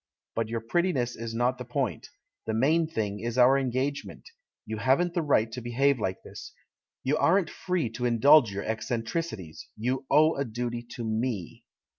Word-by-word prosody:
But 115 -1 -2
your 115 0 -2
prettiness 125 -1 0
is 115 0 -6
not 125 +2 +1
the - - -4
point; 125 -1 -3 0.4
the 110 - -1
main 155 +8 +3
thing 105 -9 -3
is 120 +1 -4
our 125 +2 +6
engagement 135 +1 -2 0.2
— - - -66
you 110 0 -4
haven't 135 +11 +2
the 175 - 0
right 115 -7 +2
to 125 - -6
behave 130 +3 +1
like 95 -3 -3
this, - - -10 0.5
you 140 +4 +1
aren't 175 +1 +3
free 180 -8 -1
to 125 +2 -4
indulge 120 +1 +6
your 100 +1 -4
eccentricities, 115 - -4
you 125 +4 -2
owe 155 +2 +5
a 140 - +1
duty 120 0 -4
to 120 - -5
]Me." 110 -4 -3
125 Hz, 175 wpm, -28 LUFS, 115-140 Hz, 0.5 s, our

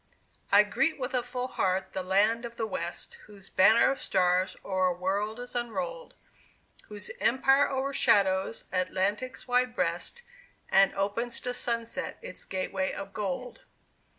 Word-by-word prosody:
I 205 +1 +8
greet 295 +10 0
with 255 0 -3
a 250 - +2
full 250 +1 -4
heart 190 -5 -1
the 190 - -2
Land 205 +5 +2
of 235 0 -7
the 225 - -2
West, 275 - -5
Whose 200 -2 -11
Banner 215 +5 +5
of 275 - -4
Stars 180 0 +1
o'er 185 -1 +1
a 180 - +1
world 200 +5 -1
is 245 0 -7
unrolled; 485 - -4 0.7
Whose 210 -1 -5
empire 270 +3 +4
o'ershadows 215 -7 +2
Atlantic's 195 +8 -1
wide 250 0 +2
breast, 480 - -2 0.5
And 195 0 +5
opens 205 +5 -1
to 250 - -2
sunset 230 -2 -2
its - - -7
gateway 190 0 -2
of 195 0 -7
gold! 250 - -4
220 Hz, 145 wpm, -29 LUFS, 190-250 Hz, 0.7 s, I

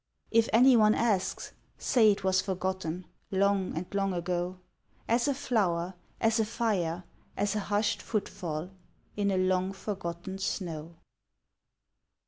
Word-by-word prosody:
If 230 0 +4
anyone 230 -2 +6
asks, 210 -6 0 0.3
say 225 -5 +4
it 200 -1 -3
was 185 -1 +3
forgotten 185 -2 -3 0.2
Long 195 -3 +1
and 170 - -2
long 195 -1 +1
ago, 175 +1 -2 0.5
As 235 +3 +2
a 285 - +3
flower, 190 -10 0 0.3
as 225 0 +2
a 220 - +3
fire, 190 -7 -1 0.3
as 205 +1 0
a - - +1
hushed 205 +1 0
footfall 175 -5 -3 0.4
In 205 -1 +1
a 190 - +1
long 185 +1 +1
forgotten 190 -2 -5
snow. 170 -4 -4
190 Hz, 125 wpm, -29 LUFS, 180-215 Hz, 0.5 s, anyone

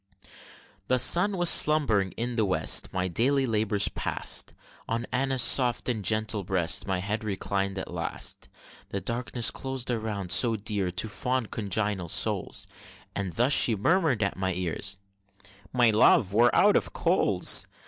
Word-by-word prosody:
The 130 - +1
sun 180 +10 +4
was 175 0 -1
slumbering 115 -11 +3
in 120 +1 -5
the 110 - 0
West. 95 -3 +1
My 95 -1 -3
daily 130 +9 0
labors 105 -3 +1
past; - - -2 0.4
On 115 +1 -3
Anna's 130 -1 +1
soft 125 -3 +4
and 115 -5 -3
gentle 110 0 0
breast 90 -1 -1
My 95 -1 -2
head 105 +5 -4
reclined 100 -1 -4
at 95 - -7
last; - - -4 0.4
The 100 - -5
darkness 120 +1 0
clos'd 130 -2 -6
around, 105 -5 -5
so 115 -3 +4
dear 105 -3 -3
To 90 +4 -4
fond 125 +3 -4
congenial 100 -3 -2
souls, - - 0 0.5
And 95 -3 -4
thus 125 +5 +1
she 115 - +4
murmur'd 145 - 0
at 100 - -3
my 95 -1 -2
ear, 90 -3 -4 0.9
"My 120 -3 +2
love, 105 -2 +2
we're 120 +3 +3
out 205 0 +3
of - - -2
coals!" - - +2
110 Hz, 150 wpm, -25 LUFS, 100-125 Hz, 0.9 s, sun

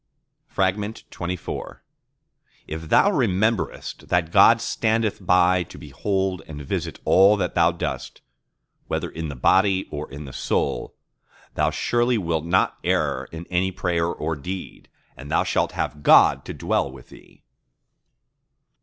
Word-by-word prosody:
XXIV 95 -2 -3 0.9
If 80 0 -7
thou 200 - +5
rememberest 110 - -1
that 90 -2 0
God 115 +6 +6
standeth 110 -3 -1
by 90 0 +4
to - - -13
behold 95 +5 -2
and 75 -2 -8
visit 70 - -3
all 100 +3 +6
that 90 -3 -2
thou 85 0 +4
doest; 85 - -5 0.7
whether - - -3
in 80 -1 -5
the 70 - -6
body 95 +8 +3
or 75 0 -5
in 70 +2 -8
the 65 - -10
soul, - - -2 0.6
thou - - +1
surely 120 0 +1
wilt 85 -5 -2
not 90 +3 +1
err - - 0
in 80 +1 -9
any 95 +2 +1
prayer 85 -2 -1
or 80 -1 -3
deed; 90 +6 -7 0.3
and 70 +2 -10
thou - - +2
shalt - - 0
have 75 - -3
God - - +5
to - - -6
dwell 70 - -1
with 65 -2 -14
thee. - - -18
90 Hz, 135 wpm, -23 LUFS, 80-100 Hz, 0.9 s, God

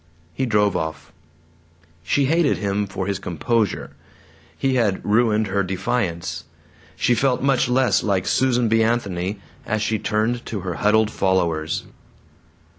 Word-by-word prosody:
He 130 - -1
drove 105 -3 +2
off. 80 -1 -4 0.9
She 135 - +1
hated 160 +1 +2
him 100 0 -1
for 95 -1 -4
his 100 0 -2
composure. 105 +4 -1 0.7
He 135 -1 0
had 110 -7 0
ruined 110 0 +2
her 100 0 0
defiance. 95 -1 -2 0.5
She 125 - +2
felt 130 +1 +1
much 135 -2 +2
less 130 0 +3
like 95 -3 0
Susan 125 -2 +2
B. 115 +1 +3
Anthony 100 -4 -1 0.2
as 110 -2 -1
she 110 0 0
turned 110 +4 -1
to 105 -4 -4
her 90 -1 -3
huddled 110 +1 +3
followers. 85 -6 0
105 Hz, 135 wpm, -22 LUFS, 95-120 Hz, 0.9 s, less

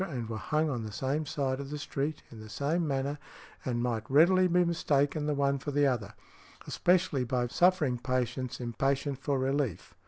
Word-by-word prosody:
and 130 - -3
were 115 - -3
hung 155 +7 0
on 130 -6 -2
the 110 - -6
same 140 +7 -2
side 135 -2 -1
of 140 -1 -6
the 150 - -4
street, 145 +1 -3
in 115 - -10
the 110 0 -10
same 155 +8 -1
manner, 140 +1 -1 0.4
and 120 -2 -1
might 115 -3 -2
readily 180 +6 +5
be 180 0 +3
mistaken 150 -3 +1
the 150 - +1
one 140 0 +1
for 140 - -5
the 145 0 +2
other, 120 -7 -1 0.5
especially 175 -7 +2
by 125 0 0
suffering 155 -3 +2
patients 130 0 -2
impatient 135 +3 -1
for 140 0 0
relief. 135 - -1
140 Hz, 185 wpm, -30 LUFS, 125-150 Hz, 0.5 s, readily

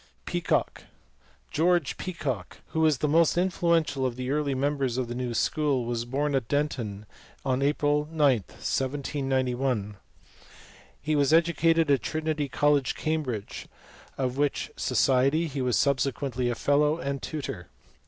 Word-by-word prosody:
Peacock. - - -1 0.7
George 170 -2 +2
Peacock, 135 - -4
who 160 - -2
was 155 -3 +4
the 150 - 0
most 165 +2 +3
influential 170 -6 +1
of 125 -2 -1
the 130 +1 -3
early 145 -2 0
members 135 -2 0
of 130 -2 -1
the 120 - -4
new 120 -1 -3
school, 140 -2 +1
was 120 -1 -2
born 140 +4 -1
at 130 -4 0
Denton 120 -8 -2 0.4
on 130 0 +1
April 145 +1 +1
9, 165 - -9 0.2
1791. 130 - -2 1.0
He 155 +1 -1
was 140 -1 +3
educated 165 -1 +3
at 135 -4 +3
Trinity 155 -1 -2
College, 145 0 +2
Cam 155 0 -1
bridge, 115 -8 -5 0.5
of 130 -1 -2
which 145 -1 0
society 135 +5 +2
he 140 -4 -4
was 125 -2 +1
subsequently 130 -2 0
a 120 - -1
fellow 150 +4 +2
and 140 -4 -3
tutor. 140 - -5
140 Hz, 140 wpm, -27 LUFS, 125-150 Hz, 1.0 s, was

